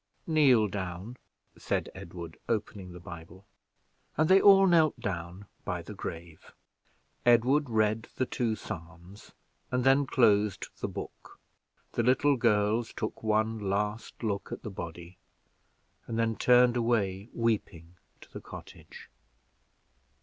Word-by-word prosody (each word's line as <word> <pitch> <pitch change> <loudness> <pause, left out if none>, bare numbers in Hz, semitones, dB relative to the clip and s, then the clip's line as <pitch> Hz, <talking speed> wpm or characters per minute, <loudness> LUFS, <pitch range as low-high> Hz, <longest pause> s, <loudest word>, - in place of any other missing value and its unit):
"Kneel 135 -9 +4
down," 95 +4 -6 0.4
said - - -2
Edward, 85 -1 -9
opening 100 -4 -3
the 90 - -10
Bible. 85 +2 -11 0.7
And 155 - +3
they 190 +1 +7
all 195 -1 +7
knelt 160 -7 +3
down 90 -3 -5 0.2
by - - -3
the - - -9
grave. 80 -1 -8 0.7
Edward 125 +4 +4
read 110 0 +1
the 130 - 0
two 115 -3 -1
Psalms, 85 +2 -10 0.4
and 125 0 0
then 135 +1 +4
closed 105 -6 +2
the - - -2
book. - - -9 0.5
The - - 0
little 130 +4 +3
girls 110 -1 +1
took 110 - -5
one 110 +1 +1
last 105 +3 -3
look 100 -3 -2
at - - -6
the 110 - -6
body, 85 0 -8 0.9
and 115 - -3
then 115 -1 +1
turned 125 0 +5
away 110 -4 0
weeping 100 -7 -2 0.3
to - - -17
the - - -7
cottage. - - -12
110 Hz, 130 wpm, -29 LUFS, 95-120 Hz, 0.9 s, they